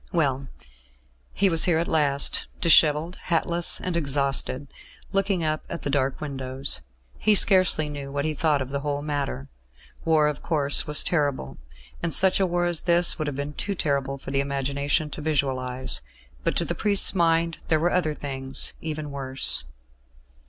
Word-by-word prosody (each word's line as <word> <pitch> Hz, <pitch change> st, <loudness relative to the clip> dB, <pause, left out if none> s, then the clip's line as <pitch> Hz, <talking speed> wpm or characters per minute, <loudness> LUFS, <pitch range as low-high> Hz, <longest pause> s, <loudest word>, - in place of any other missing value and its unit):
Well, 140 Hz, -6 st, 0 dB, 0.8 s
he 200 Hz, -, +1 dB
was 165 Hz, -3 st, +4 dB
here 170 Hz, -3 st, +2 dB
at 170 Hz, -, -1 dB
last, 140 Hz, -3 st, +1 dB
dishevelled, 160 Hz, 0 st, +4 dB
hatless 170 Hz, 0 st, +3 dB
and 180 Hz, -2 st, -4 dB
exhausted, 140 Hz, -2 st, +1 dB, 0.4 s
looking 195 Hz, -2 st, 0 dB
up 155 Hz, 0 st, -2 dB
at 170 Hz, -, -6 dB
the 140 Hz, -, -2 dB
dark 135 Hz, -1 st, -1 dB
windows. 135 Hz, -, -3 dB, 0.4 s
He 215 Hz, -1 st, +3 dB
scarcely 185 Hz, -5 st, +4 dB
knew 140 Hz, -2 st, -7 dB
what 140 Hz, +1 st, -2 dB
he 155 Hz, -, -1 dB
thought 150 Hz, -2 st, +1 dB
of 130 Hz, -, -11 dB
the 140 Hz, -, -2 dB
whole 145 Hz, 0 st, -3 dB
matter. 140 Hz, -, -4 dB, 0.6 s
War, 155 Hz, -2 st, +3 dB
of 150 Hz, -, -4 dB
course, 145 Hz, -4 st, 0 dB
was 150 Hz, 0 st, +3 dB
terrible. 145 Hz, -, -2 dB, 0.4 s
And 170 Hz, -1 st, +1 dB
such 190 Hz, 0 st, +6 dB
a 190 Hz, -, +2 dB
war 175 Hz, 0 st, -1 dB
as 175 Hz, -2 st, +3 dB
this 175 Hz, -1 st, +3 dB
would 155 Hz, -, -2 dB
have 145 Hz, -, -4 dB
been 140 Hz, +2 st, -5 dB
too 200 Hz, +6 st, -4 dB
terrible 140 Hz, -4 st, -2 dB
for 135 Hz, -, -9 dB
the 135 Hz, -, 0 dB
imagination 140 Hz, +2 st, -1 dB
to -, -, -7 dB
visualise; 130 Hz, -4 st, -1 dB, 0.4 s
but -, -, -1 dB
to -, -, +1 dB
the -, -, -2 dB
priest's 205 Hz, -2 st, +2 dB
mind 165 Hz, -2 st, +1 dB
there 155 Hz, -, +2 dB
were 175 Hz, +3 st, +1 dB
other 155 Hz, -4 st, 0 dB
things 135 Hz, -2 st, -2 dB
even 155 Hz, -2 st, -5 dB
worse. 135 Hz, -, 0 dB
150 Hz, 170 wpm, -24 LUFS, 140-170 Hz, 0.8 s, such